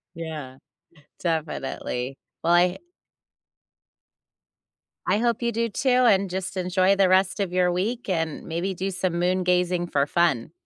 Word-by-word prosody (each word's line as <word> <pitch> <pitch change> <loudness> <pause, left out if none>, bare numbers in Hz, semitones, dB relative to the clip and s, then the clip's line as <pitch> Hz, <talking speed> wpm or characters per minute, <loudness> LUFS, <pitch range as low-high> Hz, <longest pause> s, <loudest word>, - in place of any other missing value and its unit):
Yeah, 155 -6 -7 0.6
definitely. 140 -5 -3 0.2
Well, 170 - +2
I 180 +1 +3 2.3
I - - +2
hope 235 0 0
you 235 0 0
do, 230 +1 0
too, 255 +5 -1
and 220 -7 +4
just 190 +1 -4
enjoy 185 +1 +2
the 195 -2 +3
rest 190 +2 +3
of 185 -3 -2
your 180 -1 +2
week 225 +7 -2
and 160 -4 -2
maybe 175 +3 -2
do 190 +2 -3
some 180 -2 -2
moon 180 +1 +1
gazing 180 -1 +1
for 140 -3 +1
fun. 160 -7 +1
180 Hz, 140 wpm, -25 LUFS, 170-195 Hz, 2.3 s, and